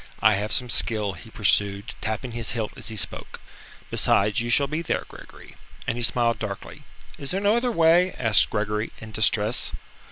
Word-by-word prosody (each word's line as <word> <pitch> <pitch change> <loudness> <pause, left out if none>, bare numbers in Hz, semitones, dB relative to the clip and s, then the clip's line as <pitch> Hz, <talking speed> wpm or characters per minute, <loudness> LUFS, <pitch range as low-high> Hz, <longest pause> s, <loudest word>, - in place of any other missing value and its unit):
I 110 0 +5
have 105 +2 -2
some 125 - -1
skill," 105 -4 +1
he 90 +5 -12
pursued, 100 +1 0
tapping 110 +3 -3
his 115 -1 -2
hilt 110 -3 -3
as - - -5
he 110 - -4
spoke, 105 - -3 0.5
"besides, 105 +4 +2
you 120 - -3
shall 140 +4 +4
be 155 +4 -3
there, 170 - -2
Gregory." - - -13 0.3
And 115 - -1
he 120 - -4
smiled 115 -1 +2
darkly. 100 -3 -6 0.4
"Is 140 - -5
there 190 - -1
no 205 +2 +3
other 240 +1 +1
way?" 170 0 +4
asked 110 -4 +4
Gregory, 105 0 -2
in 110 -1 -10
distress. 110 +1 +1
115 Hz, 185 wpm, -24 LUFS, 105-130 Hz, 0.5 s, I